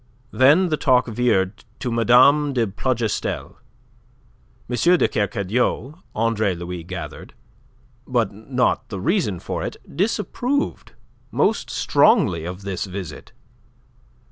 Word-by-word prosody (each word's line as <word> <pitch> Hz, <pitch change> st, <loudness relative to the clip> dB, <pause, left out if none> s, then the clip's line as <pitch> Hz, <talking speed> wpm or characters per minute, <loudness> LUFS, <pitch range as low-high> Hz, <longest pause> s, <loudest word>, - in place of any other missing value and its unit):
Then 150 Hz, +8 st, +5 dB
the 155 Hz, -, 0 dB
talk 130 Hz, -4 st, +3 dB
veered 110 Hz, -4 st, 0 dB
to 125 Hz, -2 st, -3 dB
Mme. 130 Hz, +5 st, +5 dB
de 120 Hz, -3 st, +1 dB
Plougastel. 115 Hz, +2 st, -2 dB, 1.1 s
M. 125 Hz, -, -2 dB, 0.2 s
de -, -, +3 dB
Kercadiou, 110 Hz, -, -1 dB, 0.2 s
Andre 110 Hz, -3 st, +1 dB
Louis 85 Hz, 0 st, -6 dB
gathered, 90 Hz, +1 st, -8 dB, 0.7 s
but 115 Hz, -6 st, 0 dB
not 125 Hz, +5 st, -1 dB
the 100 Hz, -, -5 dB
reason 150 Hz, -, 0 dB
for -, -, -4 dB
it, -, -, -5 dB, 0.2 s
disapproved 235 Hz, -, -1 dB, 0.4 s
most -, -, 0 dB
strongly 90 Hz, -, +3 dB
of 90 Hz, +3 st, -6 dB
this 95 Hz, -2 st, -3 dB
visit. 90 Hz, -6 st, -8 dB
115 Hz, 110 wpm, -22 LUFS, 95-135 Hz, 1.1 s, Then